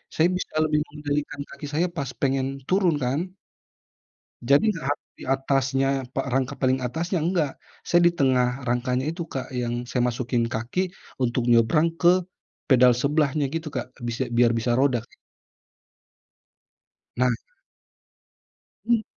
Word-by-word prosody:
saya 160 +2 +4
bisa - - -6
lebih 150 -1 +2
mengendalikan 145 -1 -3
kaki 145 - -9
saya 170 +4 +2
pas 140 -3 -2
pengen 135 -1 +1 0.2
turun 185 -4 +3
kan. 130 +5 0 1.2
Jadi 140 - +4
enggak 145 -4 -2 0.2
di - - -8
atasnya, 135 0 +1 0.3
pa 135 - 0
rangka 130 -1 0
paling 130 0 +1
atasnya, 160 +8 -2
enggak. 160 -4 0 0.3
Saya 175 - +3
di - - -2
tengah 130 -1 +2
rangkanya 125 +2 0
itu 165 +1 -4
Kak, 130 -1 -5
yang 120 -1 -2
saya 125 +1 -2
masukin 120 -1 -1
kaki, 120 +12 -2 0.3
untuk 120 -1 0
nyebrang 120 +8 +4
ke 180 +1 +5 0.4
pedal 125 -2 +5
sebelahnya 145 +2 +1
gitu 165 -1 -3
Kak. 130 -3 -5
Bis 120 +2 -2
biar 120 -1 +4
bisa 120 +1 0
roda 125 -5 +2 2.1
Nah. 125 0 +3 1.5
Mmm. 235 -1 +3
135 Hz, 130 wpm, -25 LUFS, 125-155 Hz, 2.1 s, ke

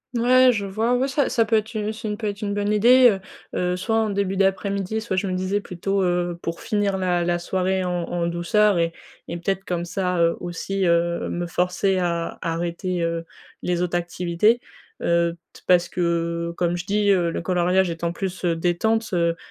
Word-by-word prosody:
Ouais, 255 +2 +5
je 205 -4 -2
vois, 220 +5 0
ouais, 260 +2 +1
ça 275 +1 +1
ça 230 - +2
peut 225 - +1
être 220 +1 0
u 215 -1 -2
ça 220 0 -6
peut 220 - -2
être 205 +1 -4
une 205 - -1
bonne 205 0 0
idée, 245 +4 +6
heu 195 -3 -1 0.4
heu, 180 0 0
soit 205 +5 -1
en 220 -1 +1
début 195 -1 -1
d'après-midi, 195 +2 0
soit, 220 -4 -3
je 185 - 0
me 185 - -2
disais, 185 +2 0
plutôt, 195 +1 -2
heu, 175 -1 0
pour 165 0 -4
finir 205 -2 0
la 180 -2 +1
la 175 0 0
soirée 185 +1 -1
en 180 -1 -1
en 170 0 -2
douceur 175 +4 +2
et 170 0 +1 0.3
et 170 - -4
peut-être 195 +2 -2
comme 175 -1 -2
ça, 180 0 -1
heu, 170 0 +3
aussi, 185 +2 -3
heu, 170 0 +1
me 175 0 -3
forcer 180 +3 0
à 170 -2 -1
à 165 - -1
arrêter, 175 +2 -2
heu, 165 0 -2 0.4
les 175 -1 0
autres 175 0 0
activités, 175 +6 +1 0.4
heu, 170 0 +1 0.2
t - - -15
parce 180 -1 +4
que, 170 -1 -1
comme 175 0 0
je 175 - -5
dis, 205 +1 +1
heu, 175 -4 +3
le - - -3
coloriage 180 +2 +2
étant 170 0 -2
plus, 190 0 -4
heu, 170 -1 +2
détente, 195 +7 0
heu, 170 -1 +2
180 Hz, 205 wpm, -23 LUFS, 170-205 Hz, 0.4 s, idée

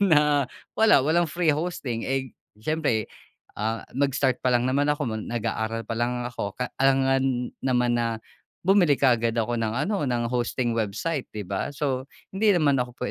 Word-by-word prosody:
na 150 -7 +4 0.2
wala, 215 -12 +5
walang 165 +3 +2
free 170 0 +2
hosting 145 -7 -3
eh, 135 -2 -2 0.2
siyempre, 120 -2 0 0.5
ah, 110 +2 -3
mag-start 135 -1 +1
pa - - +1
lang 120 -1 +3
naman 140 +3 +1
ako 150 0 +1
nag-aaral 115 0 -3
pa 110 - -5
lang 120 +1 -1
ako 115 -5 -5
ka 125 -1 -3
alangan 135 -2 +2
naman 125 -2 +1
na 115 -1 -1 0.5
bumili 180 -6 +4
kaagad 115 -4 +2
ako 115 +1 0
ng 110 0 -1
ano, 190 +6 0
ng 120 -1 0
hosting 120 0 0
website 115 +7 -2
di 105 - -4
ba? 95 +1 -3
So 135 -2 -2 0.2
hindi 205 +3 +1
naman 140 -5 +3
ako 125 0 -4
130 Hz, 160 wpm, -25 LUFS, 115-145 Hz, 0.5 s, wala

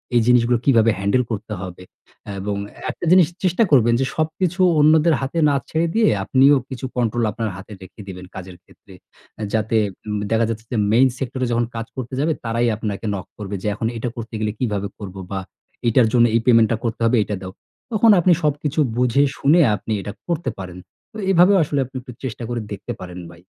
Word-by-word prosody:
এই 120 - +5
জিনিস 125 -1 +5
গুলো 120 0 +3
কীভাবে 115 -4 +4
হ্যান্ডেল 100 +6 +2
করতে 110 0 -4
হবে? 90 -1 -8 0.6
এবং 100 +1 -3 0.4
একটা - - -7
জিনিস 180 -3 +6 0.2
চেষ্টা 185 +5 +3
করবেন। 120 -4 +5
যে, - - +2
সবকিছু 170 +3 -1 0.2
অন্যদের 155 +2 +5
হাতে 135 +5 -2
না 140 - +2
ছেড়ে 165 +1 0
দিয়ে 225 0 +4
আপনিও 135 +7 +5
কিছু 130 0 -6
কন্ট্রোল 120 -1 0
আপনার 110 +1 -3
হাতে 95 +2 -12
রেখে 95 +3 -12
দিবেন, 90 -1 -8
কাজের 90 -1 -9
ক্ষেত্রে। 95 +1 -19 0.5
এ - - -2
যাতে 110 0 +1 0.3
উম 105 0 -2
দেখা 115 0 +3
যাচ্ছে 115 0 -5
যে, 120 - -1
মেইন 125 +4 +5
সেক্টর 130 0 -4
এ - - -2
যখন 120 0 +1
কাজ 115 0 -3
করতে 130 0 -6
যাবে 155 +3 +1
তারাই 115 +1 0
আপনাকে 105 -1 -4
নক 95 - -6
করবে 105 -1 -5
যে, - - -2
"এখন 115 - -2
এটা 115 +2 -3
করতে 115 -1 -8
গেলে 110 -1 -1
কীভাবে 105 -5 -1
করব?" 100 -3 -8 0.2
বা, 95 - -2 0.5
"এটার 115 0 +4
জন্য 120 -1 +5
এই 115 - +3
পেমেন্ট 115 -3 +5
টা 115 - +1
করতে 115 0 -3
হবে, 115 +2 +3
এইটা 105 - -4
দাও।" 95 -1 -7 0.4
তখন 220 0 +5
আপনি 180 +1 +3
সবকিছু 150 0 -1 0.2
বুঝে, 125 +3 +3
শুনে 155 +5 +4 0.2
আপনি 105 +3 -7
এটা 100 - -6 0.2
করতে 170 -5 -1
পারেন। 90 -2 -7 0.3
তো 220 - -11
এভাবেও 190 +2 +5
আসলে 145 -1 -1
আপনি 130 +2 -18
একটু 125 0 -11
চেষ্টা 125 -2 -5
করে 120 -1 -2
দেখতে 105 +4 -5
পারেন, 90 0 -8
ভাই। 85 - -16
120 Hz, 205 wpm, -21 LUFS, 105-140 Hz, 0.6 s, জিনিস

